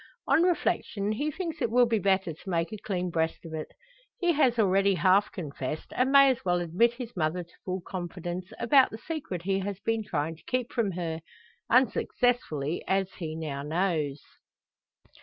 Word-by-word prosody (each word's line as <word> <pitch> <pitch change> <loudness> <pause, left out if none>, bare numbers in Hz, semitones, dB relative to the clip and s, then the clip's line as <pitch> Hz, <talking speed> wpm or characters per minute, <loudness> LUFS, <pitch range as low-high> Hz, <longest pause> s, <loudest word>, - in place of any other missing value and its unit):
On 280 +4 +4
reflection 225 - 0
he 290 +8 -1
thinks 330 0 -5
it - - +1
will 245 +2 +5
be 230 -2 +1
better 190 -3 +1
to 175 +5 -11
make 165 +1 -1
a - - -4
clean 180 -3 -3
breast 160 0 -1
of 160 - -8
it. 155 -1 -5 0.5
He 350 -2 +2
has 260 -6 +3
already 195 -2 +3
half 185 +5 +3
confessed, 150 -3 -5
and 255 +2 +2
may 275 -1 +8
as 260 0 -4
well 180 -1 +2
admit 180 +8 +2
his 240 -1 -8
mother 170 +1 0
to 170 - -22
full 185 0 -2
confidence 175 0 -5
about 265 +2 +5
the 220 - -7
secret 250 - -5
he 195 +1 +1
has 195 0 -4
been 225 -1 0
trying 160 -4 -2
to - - -21
keep 255 -2 -1
from 220 -6 0
her 165 -2 -3 0.5
unsuccessfully, 240 - +1
as 190 -1 0
he 160 -3 -4
now 150 -4 -4
knows. 155 -2 -1
190 Hz, 180 wpm, -28 LUFS, 165-235 Hz, 0.5 s, may